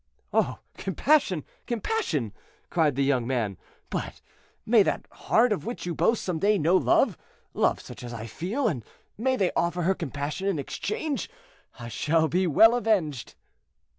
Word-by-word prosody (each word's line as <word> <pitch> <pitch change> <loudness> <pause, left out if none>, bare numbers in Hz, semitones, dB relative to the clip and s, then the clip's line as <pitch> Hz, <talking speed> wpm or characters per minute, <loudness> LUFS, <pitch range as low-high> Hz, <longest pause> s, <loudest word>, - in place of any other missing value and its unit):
"Oh! - - +2 0.2
compassion, 235 - +2 0.2
compassion!" 220 - -1 0.4
cried 155 -5 +2
the 140 - +1
young 130 -4 +1
man; 115 -7 -1 0.4
"but - - -4 0.5
may 225 -1 +6
that - - 0
heart 230 +1 +2
of 205 - -4
which 235 -2 -5
you 175 - -2
boast 230 +6 +1
some 175 -4 -2
day 205 +4 +3
know 170 +2 +3
love—love - - +1
such - - -10
as 120 - -6
I 115 -2 -6
feel, 195 - -2
and 130 - -2 0.3
may 260 +4 +1
they 195 -6 +1
offer 175 +1 0
her 190 +3 +3
compassion 150 +2 -4
in 195 -5 +1
exchange; 305 - -3 0.5
I 120 -1 -7
shall 160 +7 +1
be 180 +3 +1
well 225 +9 +6
avenged." 200 - 0
175 Hz, 155 wpm, -27 LUFS, 140-220 Hz, 0.5 s, may